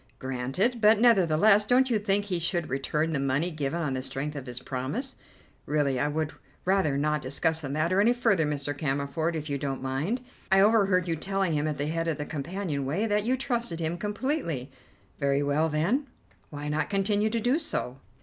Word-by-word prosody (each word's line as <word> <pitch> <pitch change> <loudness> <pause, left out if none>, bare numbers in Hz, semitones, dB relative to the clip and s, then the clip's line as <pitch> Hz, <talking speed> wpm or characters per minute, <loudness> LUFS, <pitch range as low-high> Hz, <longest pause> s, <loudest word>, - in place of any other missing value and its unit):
"Granted. 135 - -1
But 215 0 +6
nevertheless, 205 -2 +5
don't 250 +4 +3
you 220 - +3
think 200 0 +1
he 185 -4 -1
should 170 0 -1
return 150 +4 -1
the 140 - 0
money 140 +6 0
given 155 +1 -2
on 140 -4 -1
the 130 - -2
strength 140 +3 -4
of 140 -2 -6
his 125 0 -6
promise?" 135 - -4 0.5
"Really 145 -3 +1
I 145 - +1
would 155 +1 -2 0.3
rather 185 -7 +2
not 150 +1 0
discuss 160 +5 -1
the 145 - -5
matter 165 +7 +1
any 225 +3 +5
further, 230 - +2
Mr. 145 -1 -2
Cammerford, 145 +3 -1
if 155 -1 -4
you 140 -2 -2
don't 135 -1 -3
mind. 150 - -1 0.3
I 195 - +6
overheard 195 -3 +4
you 165 - 0
telling 195 +1 -1
him 150 0 0
at 150 - -2
the 145 - -1
head 165 +2 -1
of 160 -3 0
the 150 - -4
companion 155 0 -3
way 160 +11 -1
that 210 -1 +1
you 255 +2 +1
trusted 235 -9 -2
him 165 +1 -1
completely. 205 - -2 0.5
Very 140 0 +1
well, 150 +3 +1
then, 195 - 0 0.4
why 145 0 -6
not 150 +1 -1
continue 205 +1 +1
to 230 +1 -1
do 245 +7 +2
so?" 135 - -3
160 Hz, 200 wpm, -27 LUFS, 145-205 Hz, 0.5 s, But